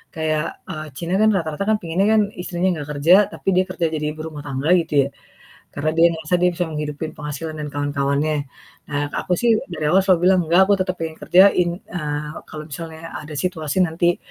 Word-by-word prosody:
kayak 155 0 -1
eee, 155 -2 -6
Cina 170 +1 -3
kan 220 - +5
rata-rata 160 +1 -2 0.2
pengennya 175 +4 0
kan - - +5 0.2
istrinya 180 +1 -1
gak 145 - -8
kerja, 165 +6 +6 0.2
tapi - - -3
dia 185 - +4
kerja 175 -3 -1
jadi 150 -1 -2
ibu 155 - -8
rumah 150 -2 -8
tangga 135 +2 -2
gitu 165 -3 0
ya. - - -11 0.6
Karna 155 +2 -1
dia 170 +1 +7
ngerasa 160 +2 -1
dia 180 - +5
bisa 175 +1 -1
menghidupi 150 0 -4
penghasilan 155 +1 -5
dan 150 - -4
kawan-kawannya. 145 +1 0 0.6
Nah 145 - 0 0.2
aku 180 - -1
sih 240 - +2 0.2
dari 150 - -3
awal 190 +4 +5
selalu 185 -3 +4
bilang, 190 -1 +4
"Enggak, 170 +4 +4
aku 205 - +6
tetep 185 -1 -1
pengen 160 -1 -4
kerjain," 180 -1 +5
eee, 150 -3 -4 0.2
kalau 155 0 -7
misalnya 160 +2 -7 0.2
ada 150 0 -9
situasi 160 0 -2
nanti 175 +1 +1
160 Hz, 195 wpm, -21 LUFS, 150-180 Hz, 0.6 s, dia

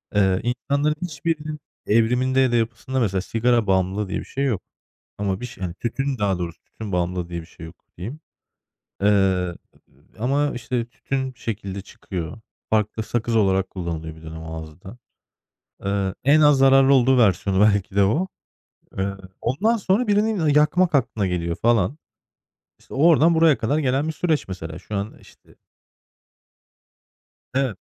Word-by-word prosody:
Eee, 95 -2 +3
insanların 140 +5 0
hiçbirinin 155 -1 -3 0.3
evriminde 125 +4 +2
ya 130 -2 +4
da - - +1
yapısında 120 +3 -1
mesela 95 -6 +1
sigara 115 +2 +1
bağımlılığı 95 +1 +1
diye - - -2
bir - - -8
şey 140 +1 -2
yok 115 -8 0 0.6
ama 100 -2 -1
bir 125 - -4
şey 110 -6 -8
hani, 85 - -4
tütün 135 +5 -2
daha 100 -3 +1
doğrusu 85 -2 -5
tütün 110 -3 -9
bağımlılığı 90 0 -1
diye 85 -1 -4
bir 80 - -12
şey 80 -1 -11
yok 80 - -13 0.2
diyeyim. 120 - -6 0.8
Eee, 100 - +3
ııı, 95 -3 +2 0.6
ama, 140 +5 +1
işte, 120 0 -2
tütün 130 +2 -4
şekilde 100 -4 -5
çıkıyor. 90 -2 -7 0.3
Farklı 110 0 0
sakız 115 0 -1
olarak 95 -3 +2
kullanılıyordu 80 -3 -5
bir 80 - -17
dönem 80 0 -8
ağızda. 80 +6 -9 0.9
Eee, 100 -1 -1
en 145 +3 +5
az 150 -2 +6
zararlı 135 0 +6
olduğu 130 0 +4
versiyonu 95 -3 +3
belki 100 -2 +3
de 100 - +5
o. 155 - +1 0.7
Iıı, 100 0 -2 0.2
ondan 195 - +1
sonra 210 +3 +1
birinin, 210 +1 +2
aaa, 160 -3 +1
yakmak 150 +4 +3
aklına 115 -6 +1
geliyor 85 -1 -2
falan. 115 - +2 0.8
İşte, - - -13
oradan 165 +3 +5
buraya 160 -3 +5
kadar 140 +7 0
gelen 140 +1 +1
bir - - -1
süreç 155 - 0
mesela. 85 -3 -6
Şu 100 +3 -6
an, 100 +2 -4
işte - - -20 2.0
Evet. 130 -7 0
115 Hz, 155 wpm, -23 LUFS, 95-135 Hz, 2.0 s, az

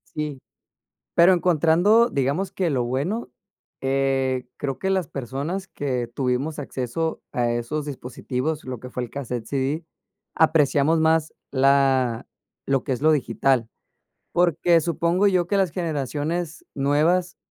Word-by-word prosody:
Sí, 150 -3 -3 0.8
pero, 175 +2 +7
encontrando 180 +7 +4
digamos 140 +8 0
que 185 -3 -1
lo 130 -5 0
bueno, 145 - -2 0.5
eh, 135 -1 0
creo 135 -2 -3
que 190 - -1
las 190 -5 0
personas 140 +10 -4
que 130 -8 -2
tuvimos 130 +5 -2
acceso 140 +4 -3
a 120 -1 0
esos 120 +6 -2
dispositivos 135 +2 -4
lo 130 -2 -6
que 125 +2 -10
fue 125 - -3
el 120 - -6
casete, 125 -5 -5
CD, 140 +4 -1 0.5
apreciamos 155 0 +3
más 160 0 +2 0.2
la 135 -3 +2 0.4
lo 135 -1 +1
que 140 - -4
es 125 - -2
lo 155 +1 +5
digital 130 -3 +1 0.7
porque, 170 -1 +3
supongo 170 +4 +1
yo 185 -3 +3
que 200 - 0
las 190 -3 +2
generaciones 160 - -3
nuevas, 160 +6 +1
145 Hz, 135 wpm, -24 LUFS, 130-170 Hz, 0.8 s, pero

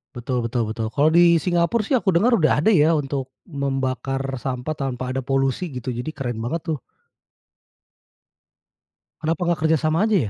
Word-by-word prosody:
Betul 120 -1 -2
betul 120 0 -1
betul. 110 0 -3
Kalau 150 +2 +4
di 170 +1 +6
Singapura 175 +5 +1
sih, 210 - -10
aku 205 - 0
dengar 225 +9 +4
udah 155 -1 +3
ada 220 - +5
ya, 160 -3 +4
untuk 135 -2 -3
membakar 135 - -2 0.2
sampah 125 +3 -3
tanpa 130 -3 -3
ada 130 - -1
polusi, 135 +5 0
gitu. 125 0 -4
Jadi 125 +6 -5
keren 120 -4 -4
banget 125 +9 -2
tuh. 155 - -1 2.4
Kenapa 165 +2 -1
gak 170 -2 +1
kerja 160 0 +4
sama 160 +5 +1
aja 215 - +2
140 Hz, 165 wpm, -22 LUFS, 130-165 Hz, 2.4 s, di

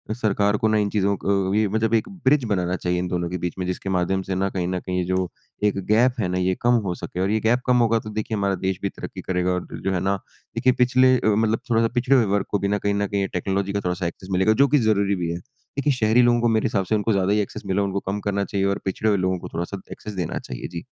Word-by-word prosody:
सरकार 105 -2 +1
को 110 - +1
ना 110 0 +2
इन 105 -1 +1
चीज़ों 100 -1 +1
को - - -8 0.4
अ, - - -6
मतलब 110 0 +1
एक 110 - +2 0.2
ब्रिज 135 0 +4
बनाना 90 -2 0
चाहिए 90 -1 -1
इन 90 - -2
दोनों 85 -1 -2
के 90 - -3
बीच 90 0 -3
में 90 - -1
जिसके 90 +1 -3
माध्यम 95 +1 +1
से 95 0 -3
ना 95 +1 0
कहीं 90 -2 -2
न 90 0 -1
कहीं 90 0 -2
जो 95 0 0 0.4
एक 105 -1 +2
गैप 120 +4 +3
है 95 - +1
ना 90 0 -1
ये 90 0 +1
कम 120 +1 +4
हो 90 - -1
सके। 90 - -6
और 95 - +1
ये 110 - +2
गैप 120 +3 +2
कम 125 -1 +4
होगा 115 -1 +3
तो 110 - -8
देखिए 110 0 -3
हमारा 100 -1 +1
देश 95 -1 -2
भी 100 - -1
तरक्की - - -8
करेगा। 90 0 0
और 90 - -3
जो - - -6
जो 95 - 0
है 90 - 0
ना, 95 +2 +1 0.4
देखिए 125 +2 +3
पिछले 130 +1 +4
अ, 120 - -1
मतलब 110 0 +1
थोड़ा-सा 115 0 +3
पिछड़े 125 +3 +3
हुए 120 -4 +4
वर्ग 100 0 0
को 100 - +1
बिना 100 +1 0
कहीं 100 0 -1
न 100 0 0
कहीं 100 0 -1
ये 95 - 0
टेक्नोलॉजी 95 +2 -1
का 100 - 0
थोड़ा-सा 90 0 -1
एक्सेस 90 +3 -8
मिलेगा 95 +4 +3
जो - - +4
कि 150 - +3
ज़रूरी 100 -1 +2
भी 85 -2 -2
है। 85 - -3
देखिए 140 +4 -3
शहरी 115 0 +3
लोगों 120 -1 +3
को 120 - +3
मेरे 110 -1 +2
हिसाब 95 -2 0
से 110 - +1
उनको 105 +2 0
ज़्यादा 100 0 +2
ही 105 - +2
एक्सेस 100 - -6
मिला 95 +1 0
है - - +1
उनको 100 0 -2
कम 105 - -2
करना 100 0 0
चाहिए 100 -1 -1
और 100 - 0
पिछड़े 105 +3 0
हुए 100 - +3
लोगों 95 -1 0
को - - -8
थोड़ा-सा 95 +3 -4
एक्सेस 105 - -7
देना 90 -4 -3
चाहिए। 60 - -7
जी। 85 -1 -7
100 Hz, 290 wpm, -23 LUFS, 95-110 Hz, 0.4 s, ब्रिज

